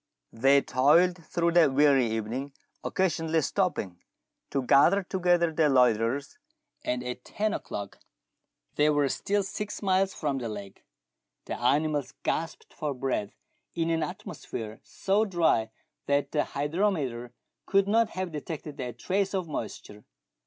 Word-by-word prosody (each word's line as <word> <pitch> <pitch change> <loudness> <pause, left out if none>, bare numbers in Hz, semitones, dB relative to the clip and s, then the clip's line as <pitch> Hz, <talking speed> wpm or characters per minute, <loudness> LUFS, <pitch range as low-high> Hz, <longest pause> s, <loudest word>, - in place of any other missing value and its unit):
They 135 +4 +4
toiled 170 +7 +3
through 170 +1 0
the 165 -4 +5
weary 135 -2 +4
evening, 115 +5 -3 0.3
occasionally 165 -3 0
stopping 135 - -1 0.5
to 135 -2 -1
gather 145 +10 +5
together 175 -2 +1
the 155 -1 +3
loiterers, 125 - +2 0.4
and 125 0 -2
at 125 0 -5
ten 215 0 -2
o'clock 100 -1 -6 0.8
they 150 +1 +4
were 145 -2 +2
still 205 +7 0
six 210 +2 -5
miles 190 0 +2
from 140 -4 -1
the 120 -2 -4
lake. 100 -2 -8 0.6
The - - -5
animals 145 +2 +1
gasped 165 0 -3
for 145 -2 -3
breath 125 -6 -2 0.4
in 165 -1 0
an 165 - +1
atmo 180 +4 -5
sphere 110 -1 -7
so 200 +2 0
dry 170 - +2 0.4
that 140 0 +1
the 150 - +1
hygrometer 145 - -1 0.4
could 195 0 +3
not 225 +1 +3
have 185 -3 -4
detected 150 -1 -6
a 125 -2 -4
trace 195 - -1
of 185 -3 -2
moisture. 105 -6 -6
150 Hz, 140 wpm, -28 LUFS, 125-180 Hz, 0.8 s, the